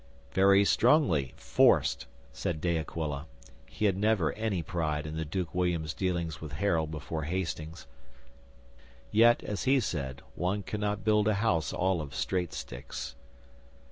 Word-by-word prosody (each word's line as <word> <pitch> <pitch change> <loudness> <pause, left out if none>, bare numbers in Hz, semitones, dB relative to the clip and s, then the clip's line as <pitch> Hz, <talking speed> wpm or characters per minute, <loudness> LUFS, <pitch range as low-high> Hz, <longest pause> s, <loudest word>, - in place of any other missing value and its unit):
'"Very 100 +3 +5
strongly, 115 - +3
forced," - - +3 0.3
said 80 -3 -3
De 85 +1 0
Aquila. 80 -2 -3 0.4
He 110 - -3
had 100 -3 +3
never 100 -4 +2
any 105 -6 -2
pride 80 -4 -2
in 75 0 -5
the 80 - -2
Duke 85 +1 -3
William's 85 -3 0
dealings 85 -4 -2
with 75 -2 -7
Harold 80 -2 +1
before 80 0 -4
Hastings. 80 -2 -4 1.3
Yet, 115 +2 +5
as 105 +3 -3
he 135 +1 +4
said, 70 - -3
one 95 +3 -1
cannot 105 +1 -2
build 105 -1 +3
a 110 - +3
house 100 -7 +1
all 95 -2 0
of 70 -2 -8
straight 90 -4 -1
sticks. - - -6
90 Hz, 140 wpm, -30 LUFS, 80-100 Hz, 1.3 s, Very